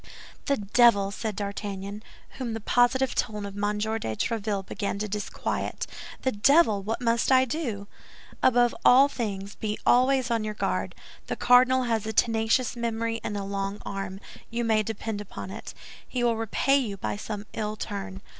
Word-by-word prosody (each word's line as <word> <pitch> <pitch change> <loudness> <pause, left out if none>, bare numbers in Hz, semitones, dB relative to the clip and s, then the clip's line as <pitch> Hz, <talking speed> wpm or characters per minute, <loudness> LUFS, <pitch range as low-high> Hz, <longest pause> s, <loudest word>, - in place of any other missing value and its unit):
"The 280 - +1
devil!" 205 -2 +4
said 215 +1 -4
D'Artagnan, 200 0 -5 0.4
whom 240 -3 -3
the - - -3
positive 245 +4 +2
tone 210 -1 -2
of 200 -1 -7
M. 205 +1 -1
de 210 +1 -1 0.3
Tréville 210 - -1
began 200 0 -3
to 210 +1 -2
disquiet, 210 0 -3 0.4
"the 260 - +2
devil! 220 -1 +4
What 220 +5 -3
must 235 +1 +2
I 260 0 +6
do?" 235 -7 -3 0.6
"Above 245 -1 +4
all 265 +3 +7
things 205 -7 -4
be 210 -1 -3
always 255 0 +4
on 230 -2 +1
your 215 0 -4
guard. - - -2 0.3
The - - -2
cardinal 255 +1 +5
has 225 -3 -1
a 220 - -2
tenacious 225 +2 +2
memory 230 -1 -2
and 205 - -3
a 200 - -3
long 195 +1 -3
arm; 195 -1 -5 0.3
you 235 +1 -2
may 220 -2 +3
depend 215 0 -4
upon 210 - -8
it, - - -8 0.3
he 250 -1 -2
will 235 -1 +3
repay 225 +5 +2
you 210 -7 -3
by 190 - -3
some 210 0 -6
ill 215 -1 -3
turn." 200 -2 -6
220 Hz, 170 wpm, -27 LUFS, 205-240 Hz, 0.6 s, all